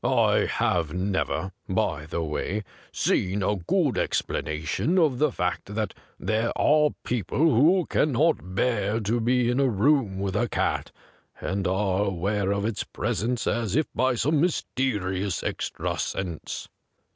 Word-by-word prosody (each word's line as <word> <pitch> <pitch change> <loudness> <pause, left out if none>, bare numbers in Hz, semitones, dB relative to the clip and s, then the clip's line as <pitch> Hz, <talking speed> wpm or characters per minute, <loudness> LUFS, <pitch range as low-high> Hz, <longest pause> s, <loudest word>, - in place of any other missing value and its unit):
I - - +3
have 85 -1 0
never, 95 0 -1 0.2
by 85 -6 -1
the 85 +1 -2
way, 95 +7 -2 0.3
seen 95 +2 0
a 105 +2 +1
good 85 - +1
explanation 80 - -1
of 150 -8 +3
the 150 -2 +3
fact 95 +1 -3
that 110 -3 -1 0.3
there 110 +2 0
are 150 0 +4
people 115 -6 -2
who 160 +5 +4
can 150 -2 +1
not 130 - +1
bear 105 -1 +1
to 110 +3 0
be 125 +1 +2
in 125 - 0
a 135 - +4
room 110 -2 +2
with 95 -1 -2
a 120 +3 +1
cat, - - -1 0.5
and 95 +1 -2
are 95 0 +1
aware 100 +1 0
of 100 0 0
its 110 -2 -1
presence 120 +2 -2
as 115 -3 0
if 155 +1 +3
by 130 +1 +2
some 145 +5 +2
mysterious 105 - -1
extra - - -3
sense. 90 -4 -4
105 Hz, 145 wpm, -26 LUFS, 95-130 Hz, 0.5 s, are